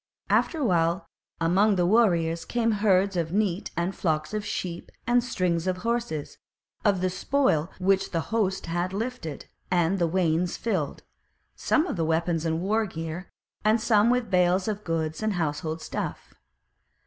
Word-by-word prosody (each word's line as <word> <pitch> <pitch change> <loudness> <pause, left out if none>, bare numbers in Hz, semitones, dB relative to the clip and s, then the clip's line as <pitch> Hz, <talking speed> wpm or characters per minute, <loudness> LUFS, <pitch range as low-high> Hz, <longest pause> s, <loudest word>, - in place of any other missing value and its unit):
After 330 - +2
a 300 - -1
while 170 -2 +2 0.3
among 190 +5 +3
the 175 -1 +2
warriors 175 -6 +3
came 230 -1 0
herds 200 -2 +2
of 165 -2 -1
neat 200 -1 0
and 175 +3 -1
flocks 155 0 -1
of 210 -1 -1
sheep 175 -4 -4
and 240 0 +3
strings 180 -7 -1
of 185 0 0
horses, 235 -11 -2 0.4
of 200 -4 +2
the 185 - +2
spoil 185 - +1
which 195 +1 +2
the 165 - -1
host 195 -4 0
had 175 +2 -2
lifted; 215 - -4 0.2
and 180 +1 +2
then 170 -2 +1
wains 175 -1 +1
filled, 185 -11 -2 0.5
some 315 - +2
with 210 - -4
weapons 165 0 0
and 160 +1 -1
war 215 +3 +1
gear, 165 +1 -6 0.3
and 215 +2 +4
some 220 -1 +4
with 245 -4 +1
bales 180 +1 +3
of 210 -1 -3
goods 160 -1 -2
and 215 -1 0
household 160 -1 -2
stuff. - - -5
185 Hz, 160 wpm, -26 LUFS, 165-215 Hz, 0.5 s, and